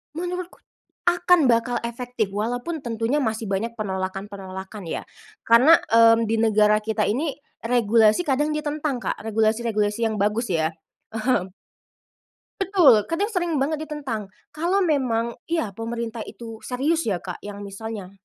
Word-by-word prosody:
Menurutku, 360 Hz, +1 st, -5 dB, 0.5 s
akan 350 Hz, -4 st, +4 dB
bakal 235 Hz, +1 st, +2 dB
efektif, 240 Hz, -2 st, -3 dB
walaupun 245 Hz, +10 st, -2 dB
tentunya 230 Hz, +4 st, -1 dB
masih 220 Hz, -1 st, -2 dB
banyak 220 Hz, +4 st, -1 dB
penolakan-penolakan 190 Hz, 0 st, -5 dB
ya, 165 Hz, -, -4 dB, 0.4 s
karena, 260 Hz, +9 st, +7 dB
mmm, 230 Hz, 0 st, +6 dB
di 225 Hz, -, +2 dB
negara 215 Hz, -1 st, +4 dB
kita 220 Hz, -1 st, 0 dB
ini, 285 Hz, +8 st, 0 dB, 0.3 s
regulasi 230 Hz, 0 st, +4 dB
kadang 295 Hz, +3 st, +1 dB
ditentang 300 Hz, -2 st, -2 dB
Kak, -, -, -2 dB
regulasi-regulasi 220 Hz, 0 st, 0 dB
yang 220 Hz, -, -2 dB
bagus 210 Hz, +2 st, 0 dB
ya, 160 Hz, -1 st, +1 dB, 0.7 s
mhm. 185 Hz, -1 st, -4 dB, 1.1 s
Betul, 340 Hz, -, +5 dB
kadang 390 Hz, +6 st, -1 dB
sering 350 Hz, -5 st, -1 dB
banget 310 Hz, +2 st, -1 dB
ditentang. 260 Hz, -9 st, -4 dB, 0.2 s
Kalau 350 Hz, +6 st, 0 dB
memang 235 Hz, -7 st, 0 dB
ya 320 Hz, -11 st, -1 dB
pemerintah 230 Hz, +2 st, -5 dB
itu 225 Hz, -2 st, -9 dB
serius 295 Hz, +6 st, 0 dB
ya 190 Hz, -5 st, -1 dB
Kak, 180 Hz, -2 st, -7 dB
yang 205 Hz, 0 st, -8 dB
misalnya 200 Hz, -1 st, -7 dB
230 Hz, 130 wpm, -23 LUFS, 210-295 Hz, 1.1 s, karena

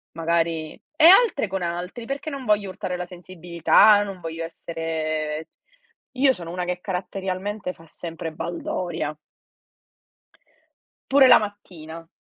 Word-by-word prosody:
magari 165 Hz, -1 st, 0 dB, 0.2 s
e 320 Hz, -, +4 dB
altre 385 Hz, -, +6 dB
con 190 Hz, -1 st, -4 dB
altri. 175 Hz, +7 st, -4 dB
Perché 275 Hz, +4 st, -4 dB
non 275 Hz, -2 st, -6 dB
voglio 210 Hz, -3 st, +1 dB
urtare 180 Hz, -1 st, -4 dB
la 180 Hz, 0 st, -5 dB
sensibilità, 180 Hz, +3 st, +3 dB
non 195 Hz, -3 st, -6 dB
voglio 165 Hz, 0 st, -5 dB
essere 160 Hz, -2 st, -4 dB, 0.7 s
io 265 Hz, +1 st, +4 dB
sono 170 Hz, -7 st, -8 dB
una 180 Hz, 0 st, -3 dB
che 180 Hz, 0 st, -3 dB
caratterialmente 190 Hz, +1 st, -4 dB
fa 165 Hz, -, -18 dB
sempre 165 Hz, -1 st, -7 dB
baldoria. 175 Hz, -, -4 dB, 1.9 s
Pure 270 Hz, -1 st, +7 dB
la -, -, +9 dB
mattina. 165 Hz, -6 st, -8 dB
180 Hz, 125 wpm, -24 LUFS, 165-205 Hz, 1.9 s, la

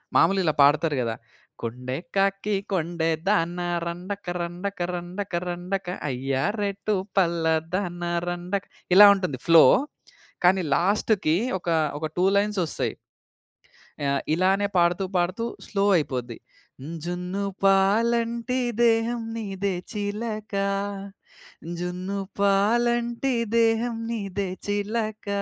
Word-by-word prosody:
మాములుగా 195 Hz, -1 st, +4 dB
ఇలా 155 Hz, -, +2 dB
పాడతారు 145 Hz, +2 st, +4 dB
గదా! 115 Hz, -2 st, -1 dB, 0.5 s
కొండే 125 Hz, +3 st, -4 dB, 0.2 s
కాకి 195 Hz, +1 st, +1 dB, 0.2 s
కొండేదాన 170 Hz, +1 st, 0 dB, 0.3 s
రండక 180 Hz, +4 st, -5 dB, 0.2 s
రండక 180 Hz, +4 st, -5 dB
రండక 180 Hz, +2 st, -5 dB
రండక 180 Hz, +2 st, -3 dB, 0.2 s
అయ్యా 135 Hz, +1 st, -1 dB, 0.2 s
రేటు 205 Hz, +1 st, -1 dB, 0.2 s
పల్లాదాన 170 Hz, 0 st, 0 dB, 0.3 s
రండక 175 Hz, +3 st, -2 dB, 0.3 s
ఇలా 205 Hz, -, +11 dB
ఉంటుంది 180 Hz, -9 st, -2 dB
ఫ్లో. 165 Hz, -1 st, +8 dB, 0.8 s
కానీ 185 Hz, +1 st, +5 dB
లాస్ట్‌కి 190 Hz, -2 st, +2 dB, 0.2 s
ఒక, 175 Hz, -, -9 dB, 0.3 s
ఒక 155 Hz, -, -3 dB
2 180 Hz, -, +3 dB
లైన్సొస్తయి. 200 Hz, -5 st, 0 dB, 1.1 s
ఆహ్, 140 Hz, 0 st, +1 dB
ఇలానే 195 Hz, +3 st, +2 dB
పాడుతూ 175 Hz, +2 st, +3 dB
పాడుతూ 185 Hz, +6 st, 0 dB, 0.2 s
స్లో 200 Hz, -1 st, 0 dB
అయిపోద్ది. 125 Hz, -6 st, -3 dB, 0.7 s
జున్నుపాలంటి 200 Hz, +7 st, +1 dB, 0.3 s
దేహం 230 Hz, +1 st, +2 dB
నీదే 200 Hz, -3 st, -2 dB, 0.2 s
చిలక, 215 Hz, +1 st, -4 dB, 1.3 s
జున్నుపాలంటి 200 Hz, +7 st, 0 dB, 0.3 s
దేహం 230 Hz, +1 st, +2 dB
నీదే 200 Hz, -4 st, -3 dB, 0.2 s
చిలక, 215 Hz, +1 st, -2 dB
195 Hz, 90 wpm, -25 LUFS, 175-205 Hz, 1.3 s, ఇలా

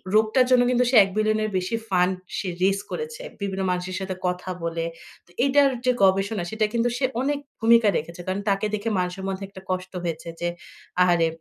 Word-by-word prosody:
রোগটার 220 Hz, +4 st, +4 dB
জন্য 250 Hz, -1 st, +6 dB
কিন্তু 250 Hz, 0 st, +3 dB
সে 255 Hz, -, +1 dB
১ 195 Hz, -, -3 dB
বিলিয়নের 215 Hz, 0 st, +1 dB
বেশি 185 Hz, +4 st, -1 dB
ফান্ড 180 Hz, 0 st, +3 dB, 0.2 s
সে 195 Hz, -, -3 dB, 0.2 s
রেইজ 195 Hz, +1 st, +3 dB
করেছে, 465 Hz, +1 st, -5 dB, 0.2 s
বিভিন্ন 195 Hz, -1 st, -2 dB
মানুষের 180 Hz, +1 st, -3 dB
সাথে 190 Hz, -1 st, -4 dB
কথা 180 Hz, +1 st, -3 dB
বলে। 165 Hz, 0 st, -2 dB, 0.4 s
তো 175 Hz, -, -24 dB
এটার 280 Hz, 0 st, +5 dB, 0.2 s
যে 255 Hz, -, +5 dB
গবেষণা, 195 Hz, +1 st, +2 dB
সেটা 220 Hz, 0 st, +1 dB
কিন্তু 235 Hz, +1 st, +2 dB
সে 265 Hz, -, +1 dB, 0.2 s
অনেক 285 Hz, +2 st, 0 dB, 0.2 s
ভূমিকা 230 Hz, 0 st, +5 dB
রেখেছে। 170 Hz, +3 st, -6 dB
কারণ, 190 Hz, +2 st, -1 dB
তাকে 195 Hz, +1 st, +1 dB
দেখে 215 Hz, +2 st, -2 dB
মানুষের 180 Hz, +1 st, -3 dB
মধ্যে 195 Hz, 0 st, -3 dB
একটা 190 Hz, -1 st, -12 dB
কষ্ট 185 Hz, 0 st, -3 dB
হয়েছে 165 Hz, -1 st, -4 dB
যে, 175 Hz, -, 0 dB, 0.5 s
আহারে, 175 Hz, -2 st, +4 dB
195 Hz, 190 wpm, -24 LUFS, 180-230 Hz, 0.5 s, জন্য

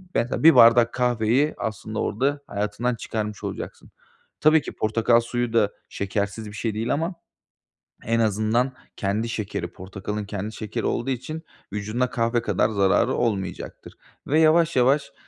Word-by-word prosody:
mesela 120 Hz, -, 0 dB
1 165 Hz, +1 st, +8 dB
bardak 115 Hz, 0 st, +7 dB
kahveyi 125 Hz, +3 st, +2 dB
aslında 110 Hz, 0 st, -4 dB
orada 140 Hz, +6 st, 0 dB
hayatından 105 Hz, +4 st, -2 dB
çıkarmış 105 Hz, -2 st, -4 dB
olacaksın. -, -, -7 dB, 0.5 s
Tabii 155 Hz, 0 st, +5 dB
ki -, -, -7 dB
portakal 115 Hz, +2 st, +2 dB
suyu 120 Hz, 0 st, -2 dB
da 105 Hz, -3 st, +3 dB, 0.2 s
şekersiz 100 Hz, +2 st, -3 dB
bir 105 Hz, -, -9 dB
şey 105 Hz, +1 st, -2 dB
değil 115 Hz, +3 st, -1 dB
ama 165 Hz, +5 st, -2 dB, 0.9 s
en 115 Hz, +1 st, +1 dB
azından 110 Hz, +4 st, +1 dB, 0.2 s
kendi 105 Hz, +4 st, -1 dB
şekeri, 110 Hz, -3 st, -3 dB
portakalın 100 Hz, +3 st, -6 dB
kendi 105 Hz, +1 st, -5 dB
şekeri 105 Hz, -1 st, -4 dB
olduğu 125 Hz, +3 st, -1 dB
için 145 Hz, +6 st, -4 dB, 0.3 s
vücuduna 110 Hz, +5 st, -1 dB
kahve 115 Hz, 0 st, 0 dB
kadar 115 Hz, -, +1 dB
zararı 105 Hz, +4 st, +2 dB
olmayacaktır 100 Hz, -6 st, -3 dB, 0.3 s
ve 155 Hz, +3 st, +3 dB
yavaş 160 Hz, 0 st, +4 dB
yavaş 140 Hz, +3 st, +3 dB
115 Hz, 140 wpm, -24 LUFS, 105-125 Hz, 0.9 s, 1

